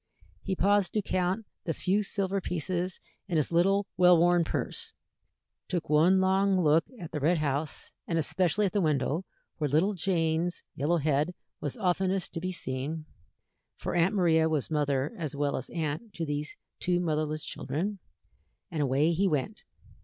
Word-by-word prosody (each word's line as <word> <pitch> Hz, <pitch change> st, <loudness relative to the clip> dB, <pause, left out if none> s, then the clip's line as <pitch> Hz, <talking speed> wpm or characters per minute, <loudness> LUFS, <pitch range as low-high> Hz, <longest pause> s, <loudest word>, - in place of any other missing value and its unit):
He 190 Hz, -, -2 dB
paused 200 Hz, +1 st, +2 dB
to 215 Hz, -, 0 dB
count 185 Hz, +5 st, 0 dB, 0.2 s
the 165 Hz, -, -1 dB
few 195 Hz, +3 st, +1 dB
silver 195 Hz, -1 st, -1 dB
pieces 180 Hz, +1 st, -2 dB, 0.3 s
in 175 Hz, -4 st, 0 dB
his 150 Hz, -, +1 dB
little 195 Hz, +4 st, +3 dB
well 180 Hz, -1 st, +7 dB
worn 175 Hz, +1 st, +4 dB
purse, -, -, -3 dB, 0.7 s
took 175 Hz, -4 st, -3 dB
one 170 Hz, +5 st, +5 dB
long 190 Hz, 0 st, +3 dB
look 160 Hz, -1 st, +4 dB
at 170 Hz, -4 st, -7 dB
the 150 Hz, -, -2 dB
red 165 Hz, +5 st, +3 dB
house, 150 Hz, 0 st, -2 dB, 0.2 s
and 165 Hz, -, 0 dB
especially 175 Hz, +6 st, +1 dB
at 190 Hz, -, 0 dB
the 205 Hz, -, +2 dB
window 155 Hz, +2 st, 0 dB, 0.3 s
where 150 Hz, -2 st, 0 dB
little 165 Hz, +9 st, +3 dB
Jane's 170 Hz, -2 st, 0 dB
yellow 160 Hz, +5 st, +1 dB
head 155 Hz, +3 st, +1 dB, 0.2 s
was -, -, -4 dB
oftenest 190 Hz, -1 st, 0 dB
to -, -, -3 dB
be 185 Hz, +2 st, -3 dB
seen 150 Hz, 0 st, -4 dB, 0.7 s
for -, -, -4 dB
Aunt 175 Hz, +4 st, +2 dB
Maria 160 Hz, -4 st, +4 dB
was 155 Hz, -1 st, -1 dB
mother 145 Hz, -, 0 dB
as 155 Hz, -4 st, -3 dB
well 145 Hz, 0 st, 0 dB
as 130 Hz, -, -5 dB
aunt 165 Hz, +7 st, -4 dB
to 165 Hz, -, -2 dB
these 145 Hz, 0 st, -4 dB, 0.2 s
two 175 Hz, 0 st, +1 dB
motherless 155 Hz, -2 st, -1 dB
children 180 Hz, +10 st, -3 dB, 0.7 s
and 160 Hz, -3 st, -1 dB
away 140 Hz, +4 st, +2 dB
he 190 Hz, +4 st, +2 dB
went. 165 Hz, +6 st, -1 dB
170 Hz, 165 wpm, -29 LUFS, 155-190 Hz, 0.7 s, well